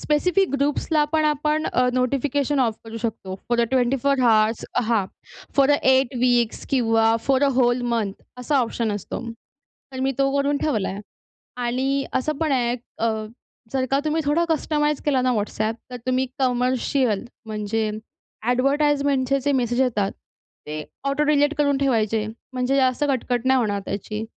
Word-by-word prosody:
Specific 360 +5 +1
ग्रुप्सला 295 +2 +1
पण 315 -1 +2
आपण 300 +1 +1
अ, 250 0 +3
notification 275 +2 0
of 230 -4 +1
करू 225 0 -8
शकतो. 220 -4 -4
फॉर 240 0 +2
अ - - +4
24 265 +1 +1
हॉर्स, 220 -2 +3 0.2
हां, 225 -4 +2 0.5
फॉर 275 0 +5
अ 290 - +5 0.2
8 260 0 +2
वीक्स 240 -2 +2
किंवा 225 -3 +3
फॉर 270 0 +3
अ - - +4
होल 245 -1 +3
मंथ 210 -4 -1 0.3
असा 275 +3 +1
ऑप्शन 230 -2 -1
असतो. 205 -2 -5 0.7
तर 260 - -5
मी 270 +1 +1
तो 275 0 +3
करून 280 +1 +1
ठेवलाय. 210 -10 -1 0.7
आणि 270 +3 0
असं 300 +3 -1
पण 315 -1 0
आहे 245 -2 +1 0.2
अं, 220 -1 -1 0.4
जर 265 -1 0
का 275 - +3
तुम्ही 310 +1 +1
थोडं 310 +4 +2
कस्टमाइज 300 -2 0
केला 275 -3 +2
ना 255 0 +2
WhatsApp, 215 +1 -2
तर 250 - -6
तुम्ही 255 +1 +1
कमर्शियल 250 -3 +1 0.2
म्हणजे 215 0 -2
अ‍ॅडव्हर्टाइजमेंटचे 275 +5 0
जे 285 +2 0
मेसेज 240 +2 0
येतात, 210 -6 +1 0.6
ते 155 0 -4 0.3
ऑटो 285 +2 +1
डिलिट 295 0 +3
करून 285 -2 +2
ठेवायचे. 225 -5 +1 0.3
म्हणजे 255 +1 0
जास्त 260 +1 +2
कटकट 245 -2 -1
नाही 260 0 +4
होणार 205 -4 0
त्याची. 210 +2 -4
255 Hz, 155 wpm, -23 LUFS, 230-280 Hz, 0.7 s, फॉर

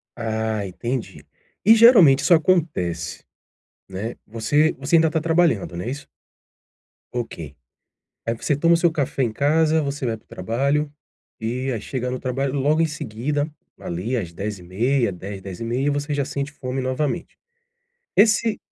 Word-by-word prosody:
Ah, 110 -2 -2
entendi. 95 - -5 0.4
E 220 - +9
geralmente 215 - +7
isso 180 - +4
acontece, 150 - 0 0.6
né. 100 +5 -5
Você 145 +8 +2
você 140 +5 +2
ainda 160 -1 +4
tá 160 - 0
trabalhando, 165 - +1
não 90 - -4
é 120 - -3
isso? 145 +2 -7 1.1
Ok, 85 - -5 0.7
aí 115 - 0
você 140 +5 -1
toma 165 +3 +3
o - - +6
seu 170 0 +3
café 140 -3 -1
em 120 - +1
casa, 155 +5 +2
você 140 -2 -3
vai 115 - -1
para 110 - -22
o - - -42
trabalho, 140 +9 -1 0.5
eh, 125 +3 -2
aí 110 - -4
chega 125 +1 -3
no 130 - -3
trabalho 135 +1 -2
logo 150 +4 +2
em 165 - +4
seguida, 145 0 -2 0.3
ali, 95 +9 -3
às 90 -8 -4
10h30, 105 +5 -1
10h00, 95 +2 -8
10h30, 115 +9 -2
você 145 +1 -2
já 140 -1 0
sente 140 +1 -4
fome 130 -2 -4
novamente. 130 +3 -2 0.8
Esse 220 +1 +4
130 Hz, 155 wpm, -22 LUFS, 110-150 Hz, 1.1 s, E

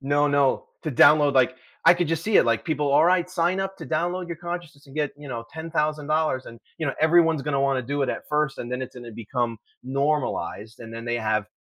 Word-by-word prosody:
No, 145 +1 +2
no. 140 -2 +2 0.2
To 155 - -2
download, 145 +2 +6
like 130 -1 +3 0.3
I - - +9
could 175 -2 -1
just 165 -1 -1
see 215 -1 +2
it, - - +6
like, 115 -1 +1
"People, 150 -3 -1
alright, 175 +3 +4
sign 175 +2 +1
up 195 0 -4
to - - -8
download 175 +3 -1
your 170 - -5
consciousness, 170 -4 -7
and 135 - -15
get, 150 -2 -1
you 145 -1 -11
know, 115 -2 -5
$10,000," 155 -3 -1
and, 115 0 -11 0.2
you 160 - -2
know, 135 - -1
everyone's 160 -2 +4
gonna 140 -2 -1
wanna 135 -2 +1
do 140 +4 -3
it - - 0
at - - -4
first, 150 -2 0
and 120 - -6
then 125 - -2
it's 130 - -8
gonna 120 -2 -9
become 115 0 -3 0.2
normalized, 130 - -2
and 115 -1 -9
then 115 +1 -7
they 120 0 -1
have 110 -2 0
145 Hz, 225 wpm, -24 LUFS, 125-160 Hz, 0.3 s, I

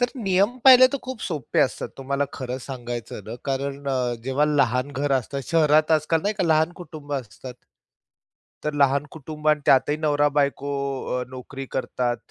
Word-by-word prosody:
तर 245 - +2
नियम 200 +2 +1
पाहिले 255 -1 +9
तर 280 - -1
खूप 260 -2 -6
सोपे 150 -8 -1
असतात. - - 0
तुम्हाला 140 +1 -1
खरं 130 -1 -5
सांगायचं 120 -5 -7
ना, 110 - -7
कारण 140 +1 -3
अ, 125 -2 0
जेव्हा 135 +3 +1
लहान 140 -2 +1
घर 140 +1 -1
असतात, 135 +1 -1
शहरात 155 -1 +4
आजकाल 155 +1 +2
नाही 205 +1 0
का 195 -3 -1
लहान 160 0 +2
कुटुंब 155 -3 -10
असतात. 125 0 -7 1.1
तर 150 - -1
लहान 140 0 +3
कुटुंब 155 0 -5
आणि 150 -1 +3
त्यातही 135 +3 +4
नवरा-बायको 145 -2 +1 0.5
अ, - - -3
नोकरी 130 +1 -8
करतात. 125 -2 -1
145 Hz, 160 wpm, -24 LUFS, 130-155 Hz, 1.1 s, पाहिले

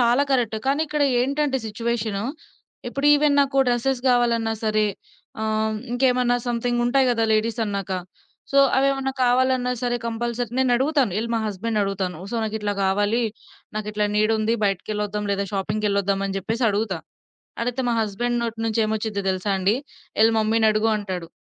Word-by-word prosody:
చాలా 240 +3 +4
కరెక్ట్. 235 -4 +1
కానీ 280 +3 +2
ఇక్కడ 300 0 -1 0.2
ఏంటంటే, 275 +1 0
సిట్యుయేషను 220 -2 -2 0.7
ఇప్పుడు 275 +4 -1
ఈవెన్ 295 0 +3
నాకు 275 0 0
డ్రెసెస్ 245 +2 0
కావాలన్నా 235 -2 +2
సరే 215 0 +2 0.6
ఆహ్, 220 0 0 0.2
ఇంకేమన్నా 250 -1 +2
సమ్‌థింగ్‌ 240 0 0
ఉంటాయి 260 +2 +3
కదా, 225 -1 +1
లేడీస్ 220 +2 +1
అన్నాక. 200 -2 -3 0.6
సో, 275 - +3 0.2
అవి 270 +1 +4
ఏమన్నా 270 -1 -2
కావాలన్నా 250 0 +2
సరే, 245 -1 0
కంపల్సరీ 235 0 -2
నేను 260 -1 +3
అడుగుతాను 265 - +1
ఎళ్ళి 230 +1 -3
మా 225 - +1
హస్బెండ్‌ని 215 +2 -2
అడుగుతాను. 190 -4 -2
సో, - - -4
నాకు 220 0 -3
ఇట్లా 210 -1 -1
కావాలి, 205 +5 +1 0.5
నాకు 215 -1 -3
ఇట్లా 210 0 +1
నీడుంది 220 +1 +2
బయటికెళ్ళొద్దాం. 210 +1 -2
లేదా 200 0 -1
షాపింగ్‌కెళ్ళొద్దాం 200 0 0
అని 195 0 -3
చెప్పేసి 225 +6 -2
అడుగుతా. 200 -3 -1 0.7
అడిగితే, 245 +2 -2
మా 235 - +1
హస్బెండ్ 240 +4 -1
నోటి 230 -1 -4
నుంచి 225 0 +1
ఏమొచ్చిందో 215 -2 -2
తెలుసా 185 +2 -2
అండి? 195 +4 +2 0.5
"ఎళ్ళి 225 +1 +5
మమ్మీని" 220 0 +2
అడుగు 215 +1 +1
అంటాడు. 185 -5 -5
225 Hz, 155 wpm, -23 LUFS, 210-245 Hz, 0.7 s, ఎళ్ళి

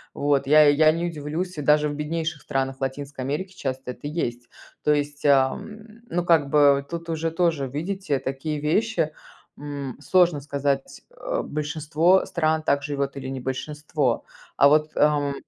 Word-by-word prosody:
Вот 140 -1 +1
я 155 +1 +7
я 155 +2 +5
не 165 +2 -2
удивлюсь, 165 +3 -4
даже 150 +1 +3
в 145 - -4
беднейших 160 +1 -3
странах 135 -1 -2
Латинской 135 0 -4
Америки 170 +8 -3
часто 130 -5 -4
это 145 - -8
есть, 120 -6 -4 0.3
то 150 - +3
есть, 145 0 -3
ам, 140 +10 +2 0.3
ну 175 0 -1
как 160 -5 +3
бы 140 -1 +4
тут 170 0 -6
уже 165 0 -1
тоже, 165 -5 0
видите, 165 +3 -2
такие 145 +3 -3
вещи, 165 +1 0 0.5
м, 140 -3 -6
сложно 175 -2 +3
сказать. 140 -1 -2
Э, - - -3
большинство 155 +4 +1
стран 160 -1 0
так 140 -1 +2
живёт 140 -1 -2
или 135 -1 -6
не 135 0 -4
большинство, 140 0 -2 0.3
а 140 - +7
вот, 150 +1 +3
ам, 145 -1 +2
150 Hz, 155 wpm, -24 LUFS, 140-160 Hz, 0.5 s, я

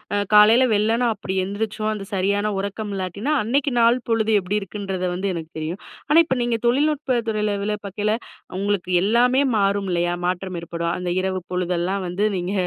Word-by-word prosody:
அ - - +2 0.2
காலைல, 225 +5 +7
வெள்ளன 225 +4 +2
அப்பிடி 190 -2 -5
எழுந்திரிச்சோம், 215 +2 -2
அந்த 200 -2 -6
சரியான 200 +2 +1
உறக்கம் 200 +2 -4
இல்லாட்டின்னா, 200 - -2
அன்னைக்கு 270 +4 0
நாள் 235 +2 +4
பொழுது 225 -1 +1
எப்படி 190 +3 -1
இருக்குன்றத 195 -2 -4
வந்து 195 +2 -2
எனக்கு 160 -1 -7
தெரியும். 160 +5 -4 0.3
ஆனா, 305 - +5
இப்போ 260 -4 -1
நீங்க 240 -1 0
தொழில்நுட்ப 275 -1 +1
துறையில 210 -1 0
வேல 210 +1 -1
பாக்கையில 205 +2 -1 0.5
உங்களுக்கு 200 -2 -1
எல்லாமே 245 +5 +3 0.2
மாறும். 200 -1 +1
இல்லையா? 175 0 0
மாற்றம் 185 0 -3
ஏற்படும். 170 0 -3
அந்த 180 0 -3
இரவு 190 0 -2
பொழுதெல்லாம் 180 +1 -1
வந்து, 180 +4 -2
நீங்க 180 +2 -3
200 Hz, 165 wpm, -22 LUFS, 185-225 Hz, 0.5 s, காலைல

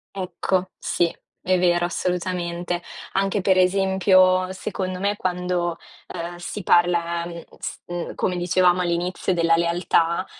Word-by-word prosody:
Ecco, 185 0 -1
sì, 175 - 0 0.4
è 185 0 +2
vero, 175 -1 +3
assolutamente. 175 -1 -2 0.3
Anche 195 +1 +1
per 190 0 +3
esempio, 185 0 +4
secondo 185 0 -4
me, 200 +2 0
quando, 180 -2 -1 0.3
ehm, 170 +1 -6
si 180 +3 -6
parla, 170 -1 +2
n 170 -1 -8
s - - -5
mhmm, 175 0 -5
come 185 - 0
dicevamo 180 0 +3
all'inizio 175 +1 -1
della 165 -1 +3
lealtà, 170 +1 +1
180 Hz, 125 wpm, -23 LUFS, 175-185 Hz, 0.4 s, esempio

